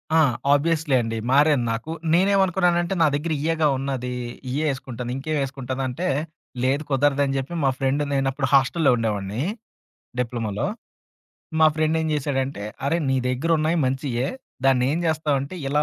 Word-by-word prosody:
ఆ! - - +6 0.3
ఆబ్వియస్లీ 155 -1 +2
అండి. 115 -1 -3
మారాను 145 -2 +4
నాకు. 115 +8 -4 0.2
నేనేమనుకున్నానంటే 185 -1 +3
నా 160 - +6
దెగ్గర 160 +3 -1
ఇయేగా 160 -1 +2
ఉన్నది 130 -2 -3 0.4
ఇయ్యే 145 +5 -1
ఏసుకుంటాను. 125 -2 -6
ఇంకేమేసుకుంటానంటే 135 +1 -3 0.6
లేదు 135 +4 +1
కుదరదని 140 0 +2
జెప్పి 135 +6 -4
మా 135 - +4
ఫ్రెండ్. 135 +2 +1
నేను 135 -1 +1
అప్పుడు 135 -1 -1
హాస్టల్లో 140 +2 +4
ఉండేవాడిని. 105 -1 -2 0.8
డిప్లొమొలో. 115 - -2 0.9
మా 160 - +8
ఫ్రెండ్ 155 0 +2
ఏం 160 - -1
జేశాడంటే. 135 -6 -2 0.2
"అరే 165 - +2
నీ 130 - +2
దగ్గర 130 +6 -1
ఉన్నాయి 155 +2 +1
మంచియే. 130 -1 -1 0.4
దాన్ని 130 -2 +4
ఏం 165 - 0
జేస్తావంటే. 150 -1 0
ఇలా 150 +2 +2
140 Hz, 135 wpm, -23 LUFS, 130-155 Hz, 0.9 s, మా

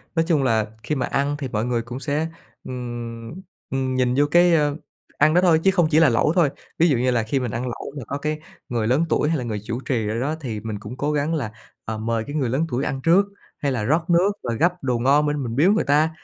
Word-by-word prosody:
Nói 165 - +2
chung 150 -6 +2
là 110 -4 +2 0.2
khi 150 - -1
mà 130 - 0
ăn 140 +1 0
thì 135 - -3
mọi 110 -1 -2
người 120 -1 0
cũng 120 +3 -7
sẽ, 150 +3 -1 0.4
ừm, 120 -2 -6 0.4
ừm, 130 -1 -1
nhìn 125 -1 +2
vô 145 - +5
cái, 175 0 +5
ơ, 150 -2 +2 0.4
ăn 155 +2 +4
đó 180 - +5
thôi 165 -3 +4
chứ 195 - +5
không 175 -4 +3
chỉ 155 - +5
là 160 -4 +6
lẩu 120 +7 +2
thôi. 165 -6 +4 0.3
Ví 170 - +5
dụ 135 - +3
như 125 +1 +2
là 115 -2 +1
khi 135 +5 -1
mình 125 -4 -3
ăn 120 - -3
lẩu 120 +3 -6
mà 130 - -5
có 140 - -3
cái 150 +1 -2 0.3
người 115 -3 -1
lớn 140 +7 +2
tuổi 150 - +2
hay 165 - +1
là 125 - -3
người 110 -3 -3
chủ 120 - -3
trì 115 -5 0
ở 115 +2 -2
đó, 150 +5 -1
thì 110 -6 -4
mình 110 -1 -5
cũng 125 +4 -8
cố 145 +1 0
gắng 150 +2 0
là, 125 -9 -2 0.3
ờ, 110 0 -3
mời 115 0 -1
cái 145 - -5
người 130 -6 0
lớn 145 +7 +1
tuổi 125 +2 -1
ăn 135 -1 -2
trước, 180 +5 +5 0.3
hay 140 -2 -1
là 115 -4 -1
rót 160 +8 +1
nước 175 +4 +4
và 120 - -2
gắp 175 +10 +2
đồ 125 -3 0
ngon 140 +4 +4
bên 145 -2 -1
mình 115 -1 -4
biếu 170 +8 +5
người 215 - +2
ta, 150 +3 +3
135 Hz, 275 wpm, -23 LUFS, 120-155 Hz, 0.4 s, là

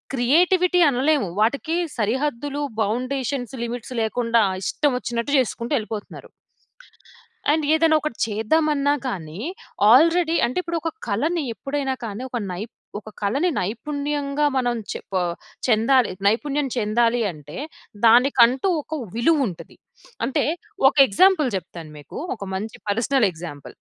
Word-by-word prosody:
Creativity 355 +8 +3
అనలేము. 270 - +1
వాటికి 280 +9 +1 0.2
సరిహద్దులు 280 +5 -1 0.2
బౌండేషన్స్, 255 +3 -2
లిమిట్స్ 245 +1 -6
లేకుండా 230 0 +2 0.2
ఇష్టం 290 -2 +1
వచ్చినట్టు 235 +3 -3
చేసుకుంటూ 235 +1 -2
ఎళ్ళిపోతున్నారు. 215 -1 -7 1.2
అండ్ 310 0 +1
ఏదైనా 315 0 +4
ఒకటి 305 -6 -4
చేద్దామన్నా 285 +6 +1
కానీ, 170 -6 -5 0.5
ఆల్రెడీ 330 +5 +5
అంటే 250 - -4
ఇప్పుడు, 335 0 -2
ఒక 325 - -1 0.2
కళని 305 +10 0
ఎప్పుడైనా 275 +1 -3
కానీ 215 +2 -6
ఒక 240 - -2
నై 180 +3 -5 0.4
ఒక 215 - -12
కళని 275 - +1
నైపుణ్యంగా 285 +6 -2
మనం 245 -2 +1 0.2
చె - - -4
పా 185 - +2 0.5
చెందాలి 240 +1 +3 0.2
నైపుణ్యం 280 +6 +1
చెందాలి 230 +2 +2
అంటే, 150 -1 -11 0.5
దానికంటూ 250 +4 +5
ఒక 315 - -9 0.2
విలువుంటది. 255 - 0 0.5
అంటే, 265 - 0 0.4
ఒక 270 - +2
ఎగ్జాంపుల్ 310 - +4
చెప్తాను 165 -3 -9
మీకు. 145 - -11 0.2
ఒక 205 - -8
మంచి 215 +3 -5
పర్సనల్ 230 +2 +2
ఎగ్జాంపుల్. 160 -4 -9
250 Hz, 120 wpm, -22 LUFS, 220-295 Hz, 1.2 s, ఆల్రెడీ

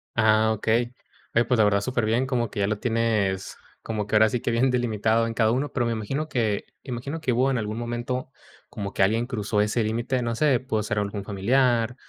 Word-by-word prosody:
Ah, 110 0 +4
okey. 120 +3 0 0.4
Oye, 115 +1 +3
pues, 125 +1 +1
la 110 - +5
verdad, 100 -1 +3
superbién, 120 +2 0
como 120 -4 0
que - - -5
ya 100 - +2
lo 105 0 -2
tienes 110 -5 0 0.3
como 110 -2 -3
que 105 - -1
ahora 110 +1 +6
sí 120 +1 -2
que - - -1
bien 120 +3 +2
delimitado 115 -2 +1
en 115 - -3
cada 110 -1 +2
uno, 135 +5 -1
pero 120 -3 0
me 115 - 0
imagino 135 +8 -3
que 110 -6 0 0.2
me 135 - -8
imagino 140 +7 -4
que 130 - 0
hubo 130 +3 +2
en 135 - 0
algún 110 -1 -3
momento 120 +2 -3 0.4
como 100 -3 -6
que - - -1
alguien 115 +4 +2
cruzó 110 -4 -2
ese 105 +3 +1
límite, 120 +4 -1
no 115 -1 -2
sé, 135 -2 +3
pudo 110 -5 -2
ser 105 0 -1
algún 100 0 -3
familiar 115 +4 +1
115 Hz, 225 wpm, -25 LUFS, 105-125 Hz, 0.4 s, ahora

